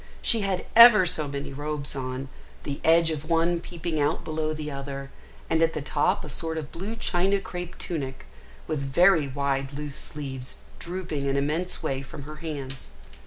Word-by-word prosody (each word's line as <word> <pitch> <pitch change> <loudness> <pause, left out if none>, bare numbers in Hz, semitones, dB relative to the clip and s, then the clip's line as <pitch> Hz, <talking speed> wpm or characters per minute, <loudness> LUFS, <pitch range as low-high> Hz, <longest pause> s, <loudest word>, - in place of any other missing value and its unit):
She 230 - +3
had 195 -2 -1
ever 230 -4 +10
so 155 -3 0
many 140 0 -5
robes 145 0 -2
on, 130 0 -4 0.4
the 140 -1 -4
edge 165 0 +5
of 155 0 -5
one 170 +1 +3
peeping 170 -2 -4
out 145 +3 +1
below 155 0 -1
the 155 -1 -4
other, 140 0 -6 0.4
and 160 - +2
at 165 0 +3
the 155 - -3
top 145 +1 +1
a - - -7
sort 160 +3 -1
of 150 -2 -5
blue 200 +6 -5
China 195 -1 +1
crape 180 -2 -6
tunic, 135 -6 -4 0.4
with 155 -2 -2
very 155 +3 +4
wide 135 0 -1
loose 145 0 -5
sleeves 130 -4 -5 0.2
drooping 170 -5 -3
an 135 0 +1
immense 155 +6 -1
way 135 0 -1
from 140 +1 -9
her 155 +2 -9
hands. 135 - -6
150 Hz, 175 wpm, -26 LUFS, 140-170 Hz, 0.4 s, ever